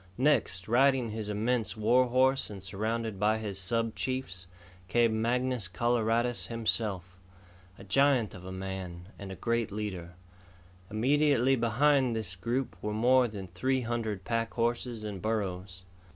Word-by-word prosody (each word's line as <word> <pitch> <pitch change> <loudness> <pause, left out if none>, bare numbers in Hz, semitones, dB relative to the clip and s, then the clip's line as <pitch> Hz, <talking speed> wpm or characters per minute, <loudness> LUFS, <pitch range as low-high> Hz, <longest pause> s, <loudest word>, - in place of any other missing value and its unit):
Next, 125 -9 +2
riding 130 0 +3
his 110 -1 -5
immense 110 +2 -1
war 125 +4 +3
horse 130 +2 +2
and 100 -3 -8
surrounded 110 +2 -3
by 105 +2 +2
his 105 -3 -4
sub 115 +3 0
chiefs, 125 -9 -4 0.4
came 115 0 +2
Mangus 125 -2 +1
Coloradus 120 +5 +1
himself 105 -6 -1 0.6
a - - -12
giant 130 +2 +2
of 90 - -10
a 95 - -7
man 95 -1 -6
and 100 -1 -7
a - - -6
great 115 +1 -1
leader. 95 -4 -5 0.7
Immediately 135 +3 +3
behind 130 +2 +2
this 100 -5 -4
group 120 +8 -2
were 105 - -3
more 125 +3 +4
than 100 -4 -7
three 130 +9 0
hundred 110 -5 -3
pack 115 -1 -2
horses 120 -1 -1
and 100 -3 -5
burros. 95 -4 -3
110 Hz, 140 wpm, -30 LUFS, 100-125 Hz, 0.7 s, more